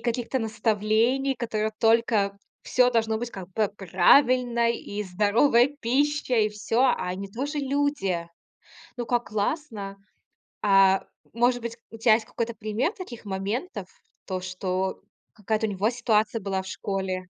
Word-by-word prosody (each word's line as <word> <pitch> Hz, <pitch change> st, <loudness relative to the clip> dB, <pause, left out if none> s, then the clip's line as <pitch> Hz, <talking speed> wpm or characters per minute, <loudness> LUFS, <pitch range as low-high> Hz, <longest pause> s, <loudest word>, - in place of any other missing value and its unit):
каких-то 240 Hz, +2 st, -1 dB
наставлений, 225 Hz, +4 st, +1 dB
которые 220 Hz, -3 st, -2 dB
только 225 Hz, -3 st, +2 dB, 0.3 s
всё 250 Hz, -1 st, +3 dB
должно 225 Hz, -2 st, +1 dB
быть, 235 Hz, +2 st, -4 dB
как 190 Hz, -5 st, -8 dB
бы, 215 Hz, -2 st, +2 dB
правильно, 235 Hz, -, +4 dB
и 210 Hz, -3 st, -4 dB
здоровая 215 Hz, +7 st, +3 dB
пища, 285 Hz, +3 st, +1 dB
и 215 Hz, -2 st, +3 dB
всё, 215 Hz, +3 st, 0 dB
а 250 Hz, -8 st, +2 dB
они 195 Hz, +2 st, -4 dB
тоже 275 Hz, +8 st, -4 dB
люди. 275 Hz, -12 st, -1 dB, 0.7 s
Ну, 240 Hz, -1 st, -4 dB
как 240 Hz, 0 st, 0 dB
классно! 210 Hz, -3 st, -3 dB, 0.7 s
А 195 Hz, -1 st, +5 dB, 0.3 s
может 245 Hz, +2 st, +2 dB
быть, 230 Hz, 0 st, -5 dB
у 225 Hz, -, -10 dB
тя 220 Hz, -1 st, +5 dB
есть 220 Hz, 0 st, -1 dB
какой-то 235 Hz, 0 st, -3 dB
пример 220 Hz, -, -1 dB
таких 355 Hz, -, -9 dB
моментов, 200 Hz, -, -4 dB, 0.4 s
то, 185 Hz, -1 st, -3 dB
что 185 Hz, 0 st, -3 dB, 0.3 s
какая-то 215 Hz, +1 st, -1 dB
у -, -, -3 dB
него 200 Hz, +3 st, 0 dB
ситуация 225 Hz, -2 st, +1 dB
была 190 Hz, -1 st, -2 dB
в -, -, -13 dB
школе? 190 Hz, -1 st, -3 dB
220 Hz, 140 wpm, -26 LUFS, 200-245 Hz, 0.7 s, А